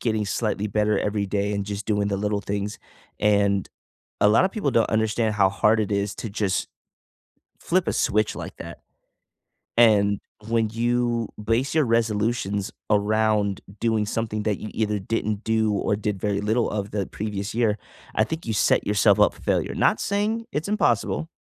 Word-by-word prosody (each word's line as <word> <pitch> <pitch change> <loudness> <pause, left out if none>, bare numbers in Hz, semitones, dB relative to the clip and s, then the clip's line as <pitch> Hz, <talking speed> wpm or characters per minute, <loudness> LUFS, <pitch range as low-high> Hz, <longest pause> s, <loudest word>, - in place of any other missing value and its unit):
getting 110 -3 0
slightly 105 0 -1
better 105 0 +1
every 105 -1 -1
day 100 +1 -1
and 100 -1 -2
just 105 0 -5
doing 105 -2 +1
the 100 - -1
little 105 0 -1
things, 100 +1 -3 0.4
and 100 -2 +2 0.5
a - - +6
lotta 185 - +4
people 195 - -1
don't 115 -2 +2
understand 110 0 +1
how 95 -2 +4
hard 105 +3 +2
it 105 -1 -1
is 100 0 -1
to 115 - -5
just 100 -2 -1 0.9
flip 180 0 0
a - - +1
switch 110 +1 +1
like - - -7
that. 85 0 -9 1.0
And 105 -3 +4 0.3
when 115 -1 +1
you 120 0 0
base 120 +6 0
your 155 - +4
resolutions 110 -3 0 0.2
around 105 -1 +2 0.2
doing 110 -2 +1
something 110 -1 -2
that 105 -3 0
you 110 - -6
either 105 -2 0
didn't 105 +1 -2
do 110 -1 +1
or 100 0 0
did 105 -2 -3
very 100 0 0
little 110 +3 +1
of 100 -1 -3
the 100 -3 -1
previous 105 0 -4
year, 115 -3 +2 0.4
I 110 - +3
think 160 +4 -5
you 115 - -1
set - - +2
yourself 105 -1 +4
up - - +4
for - - -17
failure. - - 0
Not - - +2
saying 215 +3 -1
it's 155 +6 -2
impossible 160 - +1
105 Hz, 175 wpm, -24 LUFS, 100-115 Hz, 1.0 s, a